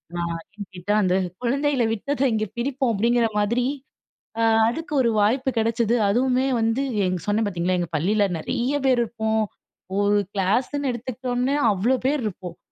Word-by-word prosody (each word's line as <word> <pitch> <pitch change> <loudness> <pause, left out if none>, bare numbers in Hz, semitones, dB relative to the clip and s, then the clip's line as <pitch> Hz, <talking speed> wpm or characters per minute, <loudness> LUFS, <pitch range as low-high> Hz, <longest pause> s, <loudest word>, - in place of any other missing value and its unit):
நான் 170 -1 -2 0.2
எங்கிட்ட, 190 -1 -6
"அந்த 185 -2 +2 0.3
குழந்தைல 275 +1 +1
விட்டத, 270 +6 -2
இங்க 215 -1 0
பிடிப்போம்." 260 0 0
அப்படிங்கிற 235 +3 +2
மாதிரி. 235 +4 +1 0.8
அ - - +2 0.3
அதுக்கு 315 +6 -4
ஒரு 235 - +2
வாய்ப்பு 255 +6 +2
கெடச்சது. 230 0 +1
அதுவுமே 255 +4 +2
வந்து 225 +4 +1 0.2
எங் 185 0 -1
சொன்னேன். 210 +2 +1
பார்த்தீங்களா! 180 -1 0
எங்க 175 - -2
பள்ளியில 200 +6 +2
நெறைய 240 - -2
பேர் 255 -2 +3
இருப்போம். 220 -1 -1 0.6
ஒரு 205 0 +3 0.2
கிளாஸ்னு 250 +8 0
எடுத்துக்கிட்டோம்னா, 250 +2 -2 0.2
அவ்வளோ 220 +7 +1
பேர் 285 0 +1
இருப்போம். 180 -4 -6
230 Hz, 140 wpm, -23 LUFS, 205-255 Hz, 0.8 s, பேர்